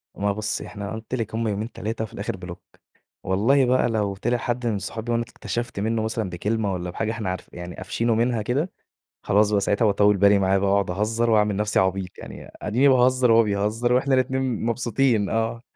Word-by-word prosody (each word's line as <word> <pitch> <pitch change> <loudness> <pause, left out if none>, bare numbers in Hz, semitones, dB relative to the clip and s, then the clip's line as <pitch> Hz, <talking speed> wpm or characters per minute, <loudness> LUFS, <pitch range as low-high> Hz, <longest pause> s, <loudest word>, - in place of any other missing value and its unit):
ما 100 0 0
بُصّي، 105 +1 -3
إحنا 100 -1 -6
قُلت 110 +3 -5
لِك 115 -3 -4
هم 115 0 -1
يومين، 105 +3 -3
3 110 +1 -4
وفي 110 - -8
الآخر 100 -1 -4
بلوك. 90 -1 -9 0.6
والله 115 +9 +3
بقى 125 0 +2
لو 105 -3 -1
طلع 120 +5 0
حد 120 +1 -3
من 105 -3 0
صحابي 110 +5 -4
وأنا 115 0 +1
اكتشفْت 120 -1 -5
منّه 110 +2 0
مثًلًا 110 -2 -2
بكلمة 100 +3 -1
والّا 90 0 -4
بحاجة 110 +5 -2
إحنا 110 -4 -3
عارف 90 - -5
يعني 85 0 -7
قافشينه 115 +5 -1
منها 115 0 +1
كده، 140 - -1 0.5
خلاص 105 +1 +3
بقى 100 -1 +2
ساعتها 100 +3 +1
باطوِّل 105 -1 +3
بالي 100 +1 +5
معاه 95 0 +2
بقى 100 0 +1
وأقعد 100 -2 +1
أهزّر 110 +5 0
وأعمل 105 -2 +3
نفسي 105 +1 +1
عبيط. 95 0 0
يعني - - -10
أدِيني 120 +7 +2
باهزّر 130 -1 +4
وهو 115 0 +6
بيهزّر 105 +4 0
وإحنا 130 +2 +2
الاتنين 130 -2 0
مبسوطين 120 -2 +1
آه. 115 +1 -1
110 Hz, 200 wpm, -24 LUFS, 100-120 Hz, 0.6 s, وهو